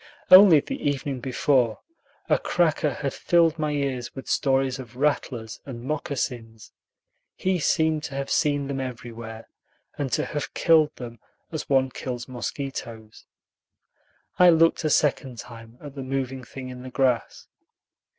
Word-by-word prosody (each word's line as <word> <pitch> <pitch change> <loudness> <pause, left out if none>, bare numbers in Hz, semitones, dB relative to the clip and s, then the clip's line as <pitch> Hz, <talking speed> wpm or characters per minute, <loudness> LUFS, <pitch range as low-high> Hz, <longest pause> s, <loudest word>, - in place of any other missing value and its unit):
Only 185 -5 +9
the 275 - -6
evening 140 -2 -2
before 125 -2 +1 0.5
a - - +3
cracker 160 -3 +1
had 140 -1 -3
filled 165 -2 +2
my 155 -1 0
ears 140 -4 -3
with 135 - -8
stories 135 -1 +1
of 120 -2 -10
"rattlers" 125 -5 -1
and 120 -4 -8
"moccasins." 125 -6 -4 0.6
He 185 -1 0
seemed 160 0 +1
to 135 - -7
have 140 0 -4
seen 145 -3 +1
them 135 -1 -3
everywhere, 115 -3 -7 0.5
and 140 -3 -2
to - - +1
have 145 - -5
killed 155 -2 +4
them 120 -2 -9 0.3
as 155 - -5
one 130 -1 +3
kills 125 -2 -5
mosquitoes. 120 -3 -6 1.1
I 180 -1 +8
looked 165 0 +4
a 155 - +1
second 135 -4 +1
time 115 0 -11
at 145 -2 -10
the 140 - -7
moving 130 -1 -3
thing 130 +1 -9
in 125 0 -9
the 130 - -8
grass. 130 -3 0
135 Hz, 145 wpm, -25 LUFS, 125-150 Hz, 1.1 s, Only